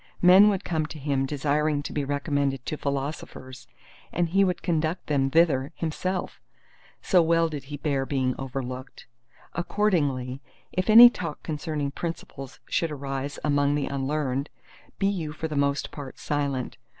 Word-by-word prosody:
Men 190 +4 +8
would 200 -1 -1
come 160 -3 -1
to 155 - -9
him 135 -2 -1
desiring 145 +1 0
to - - -6
be 145 - -1
recommended 140 -2 -1
to - - -2
philosophers, 140 -2 -5 0.4
and 175 -1 0
he 195 +3 +4
would 180 -2 -1
conduct 165 0 -1
them 135 -3 +1
thither 150 -2 +2
himself—so 180 +2 -3
well 165 0 +3
did 150 -4 -6
he 145 +1 -6
bear 140 -2 -1
being 130 -2 0
overlooked. 130 0 -6 0.5
Accordingly 145 -9 0 0.3
if 185 +3 -1
any 235 +2 +11
talk 165 -8 -6
concerning 150 -2 -3
principles 140 -4 -6
should 165 - 0
arise 140 -1 -4
among 145 -1 +2
the 145 -2 0
unlearned, 140 0 -2 0.5
be 195 - 0
you 175 -7 -1
for 160 +1 -4
the 155 - -5
most 140 0 0
part 140 -3 -8
silent. 140 -4 -2
145 Hz, 150 wpm, -26 LUFS, 135-165 Hz, 0.5 s, any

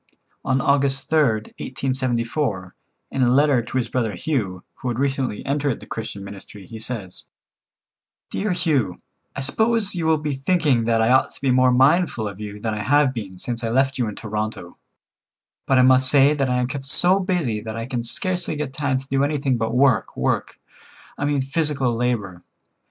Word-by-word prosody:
On 130 0 +1
August 140 +1 +1
3rd, 120 -9 +2
1874, 120 -5 -2 0.4
in 135 - -1
a 125 - +4
letter 140 0 +4
to 120 - -5
his 120 -2 0
brother 115 -4 -1
Hugh, 95 - -2
who - - -6
had 120 -2 -1
recently 135 -4 -1
entered 140 -2 -1
the - - -12
Christian 105 -3 -6
ministry, 100 0 -11
he 110 +4 -9
says: 110 -5 -3 1.1
"Dear 205 0 -1
Hugh,—I 140 - -2
suppose 220 - 0
you 170 -3 -2
will 160 -1 +4
be 150 -1 -3
thinking 135 -4 +1
that 115 -1 +2
I 115 - +3
ought 130 - +3
to - - -16
be 135 -2 +2
more 130 0 +4
mindful 135 - +3
of 100 0 -8
you 105 0 -7
than 110 +1 -2
I 105 - -3
have 140 +4 +3
been 100 -6 -7
since 120 +4 -4
I 115 - -1
left 135 +3 +1
you 120 - +1
in 105 - -5
Toronto, 105 -4 -5 0.9
but 135 - +3
I 125 - +6
must 130 0 +5
say 140 +1 +5
that 140 -3 0
I 125 - +1
am 125 - +1
kept 135 +2 -6
so 180 +6 +5
busy 170 - -1
that 110 +1 -6
I 115 - -3
can 125 -2 -3
scarcely 175 - -2
get 145 -3 -4
time 140 -2 0
to 135 +1 -7
do 135 0 +1
anything 140 -2 0
but 115 0 -1
work, 130 -1 +2
work. - - -1 0.6
I 145 - -3
mean 145 -2 +1
physical 135 -3 0
labor. 115 -7 -2
130 Hz, 190 wpm, -22 LUFS, 115-145 Hz, 1.1 s, I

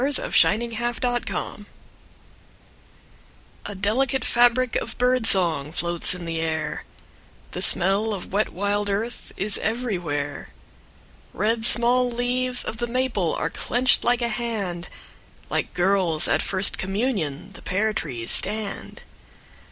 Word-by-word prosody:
VI 270 -5 +4
The 235 +1 -3
Dark 245 -1 -1
Cup - - -5
May - - -12
Day - - -19 2.0
A 205 - -6
delicate 250 +8 0
fabric 245 +1 +2
of - - -5
bird 250 -1 +1
song 165 -8 +2
Floats 170 +2 0
in 175 -1 -8
the 165 -1 -3
air, 160 -1 -3 0.7
The - - -5
smell 200 +5 +6
of 190 -2 -6
wet 210 +2 +1
wild 205 +2 -2
earth 220 +4 -4
Is 200 +1 +2
everywhere. 175 - -3 0.9
Red 220 +2 0
small 245 +1 +3
leaves 250 +1 -1
of 220 - -5
the 240 +1 -3
maple 235 -9 -1
Are - - -3
clenched 250 +1 +1
like 245 0 +1
a 235 - 0
hand, 215 -7 -4 0.6
Like - - -1
girls 180 -3 +2
at - - +3
their - - -2
first 190 0 0
communion 195 - -3
The - - -12
pear 215 +4 -1
trees 125 - -3
stand. 210 -2 +1
210 Hz, 135 wpm, -23 LUFS, 180-240 Hz, 2.0 s, smell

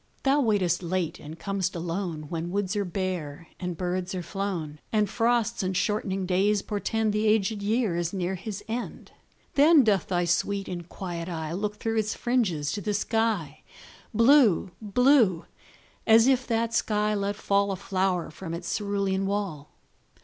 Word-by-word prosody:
Thou 280 +2 +3
waitest 195 - +1
late 180 -1 -2
and 155 +2 -9
com'st 195 -1 -2
alone, 170 -1 -3
When 165 +3 -4
woods 200 +1 -1
are 205 - +1
bare 175 -5 -4
and 180 -2 -4
birds 180 +1 -2
are 180 - -3
flown, 170 -5 -4
And 210 -2 +2
frosts 235 +1 +1
and 185 -1 -1
shortening 195 -2 -1
days 195 +3 +2
portend 215 +1 -1
The 210 +1 +1
aged 210 -1 +2
year 215 -2 +1
is 175 0 -1
near 185 -1 -2
his 200 +2 -6
end. 235 +2 -5 0.4
Then 295 0 +6
doth 205 -5 +2
thy 175 -1 0
sweet 195 +3 0
and 175 -1 -6
quiet 175 -2 -5
eye 160 -2 -4
Look 210 +3 -2
through 225 +1 -2
its 215 0 0
fringes 190 - 0
to 205 - -3
the 210 0 -1
sky, 205 -9 -1 0.5
Blue 230 - +5
blue 220 - +3 0.6
as 225 0 +7
if 255 -1 +2
that 230 0 0
sky 210 -2 +1
let 200 0 -1
fall 200 -1 +1
A - - -1
flower 185 -3 -1
from 165 0 -6
its 170 0 -7
cerulean 200 -2 -1
wall. 195 -8 -3
195 Hz, 165 wpm, -27 LUFS, 175-215 Hz, 0.6 s, as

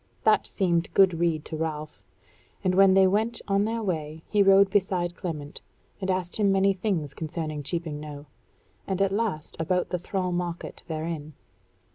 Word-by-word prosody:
That - - +4
seemed 175 -4 0
good 185 -4 +5
rede 165 -3 0
to 160 - -5
Ralph, 155 -1 -4 0.6
and 185 -1 +2
when 190 0 +6
they 190 0 +6
went 215 +5 +1
on 200 0 +2
their 225 +1 -2
way 160 -4 -3
he 210 - +2
rode 195 0 +6
beside 180 -3 +1
Clement, 150 -4 -6 0.4
and 190 - -2
asked 185 -1 -1
him 205 -2 +3
many 195 0 +3
things 180 -7 -2
concerning 155 -1 -4
Cheaping 160 0 -3
Knowe; 150 -1 -8 0.6
and 190 -1 -1
at 195 -1 +2
last 200 -7 -2
about 180 +3 0
the 180 - -2
thrall 185 +1 -2
market 175 -1 -4
therein. 155 -2 -4
180 Hz, 165 wpm, -26 LUFS, 160-195 Hz, 0.6 s, when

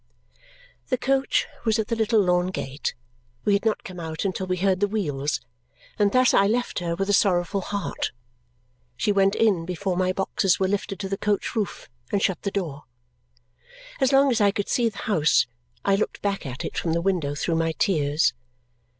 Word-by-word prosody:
The 255 - 0
coach 270 +2 +1 0.2
was 220 -1 +2
at 220 -1 -2
the 230 - +1
little 220 0 +2
lawn 180 -2 +2
gate 140 -6 -4 0.5
we 205 - +3
had 200 - +2
not 220 - +1
come 185 -1 -8
out 160 +2 -4
until 190 -1 -2
we 185 0 0
heard 190 0 +2
the 205 - +2
wheels 150 -11 -1 0.6
and 205 -1 +4
thus 255 +2 +4
I 200 - +5
left 240 +1 0
her, 170 -1 -2
with 195 +2 -2
a 205 - +2
sorrowful 195 -1 +2
heart. 200 +2 -3 0.9
She 175 +10 +1
went 195 -1 +3
in 200 -7 +3
before 180 +2 -2
my 185 0 +1
boxes 190 -1 +1
were 190 - +2
lifted 195 0 -2
to 195 - -3
the 195 0 -3
coach 210 +3 -1
roof 210 -4 -3 0.2
and 200 - +2
shut 190 -4 0
the 200 - -1
door. 165 -8 -4 1.1
As 265 -1 +3
long 275 0 +5
as 235 -3 +1
I 205 - +5
could 205 0 -2
see 235 -2 +2
the 205 - -15
house, 165 -9 +3 0.4
I 195 - +4
looked 205 - -2
back 200 -6 -1
at 130 +1 -5
it - - -3
from 165 - -1
the 170 - +1
window 170 -6 0
through 165 +3 0
my 165 0 +1
tears. 155 -5 +2
195 Hz, 195 wpm, -25 LUFS, 175-210 Hz, 1.1 s, I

